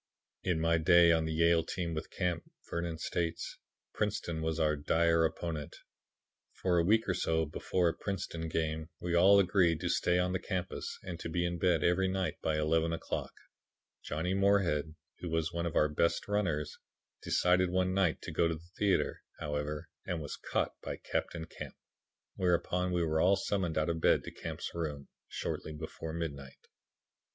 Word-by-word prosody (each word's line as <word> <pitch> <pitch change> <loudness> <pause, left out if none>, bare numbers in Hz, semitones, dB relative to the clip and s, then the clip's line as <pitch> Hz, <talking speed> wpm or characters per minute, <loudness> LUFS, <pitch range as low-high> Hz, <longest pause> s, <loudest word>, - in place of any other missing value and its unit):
"In 90 -3 0
my 80 0 +3
day 85 +1 +6
on 80 -1 +3
the 80 - -2
Yale 85 +1 +4
team 85 -1 -3
with 80 0 -4
Camp," 90 -2 -2 0.2
Vernon 85 -1 -3
states, 85 0 -3 0.3
"Princeton 80 -2 -2
was 80 0 -1
our 75 -1 +3
dire 80 +3 +3
opponent. 80 -2 -3 0.8
For 90 -2 +1
a - - +3
week 110 +5 +3
or 95 - +2
so 80 -2 +1
before 85 +3 0
a - - -2
Princeton 85 -4 -4
game, 80 0 -2
we 90 -1 -2
all 95 +4 +7
agreed 90 -4 +3
to - - -1
stay 90 - +2
on 90 0 +1
the 95 - 0
campus 95 -2 -4
and 85 -2 -6
to - - -5
be 85 +1 0
in 85 0 -2
bed 85 -3 +3
every 90 +2 +3
night 95 0 -2
by 80 -1 0
eleven 80 +2 +2
o'clock. 85 - -3 0.7
Johnny 80 +5 -2
Moorhead, 95 -6 +2 0.2
who 90 - -5
was 80 +1 0
one 85 0 -1
of 85 - -5
our 75 - +5
best 75 +3 0
runners, 90 -8 -1 0.4
decided 90 0 +3
one 95 0 +1
night 95 -4 +1
to - - -5
go 85 - +2
to 80 - -1
the 85 +2 -14
theatre, 100 -2 +1 0.2
however, 75 0 -3 0.2
and 90 - -1
was 75 -2 -5
caught - - -1
by - - -5
Captain 80 -2 -3
Camp, - - -9 0.6
whereupon 90 0 +1
we 90 -1 +1
were 80 -1 +1
all 95 +2 +5
summoned 95 -4 -1
out 75 - +2
of 80 -1 -1
bed - - +4
to - - -7
Camp's - - -6
room, 75 -4 -4 0.2
shortly 80 - -4
before 80 +1 -6
midnight. 70 -5 -6
85 Hz, 180 wpm, -32 LUFS, 80-90 Hz, 0.8 s, all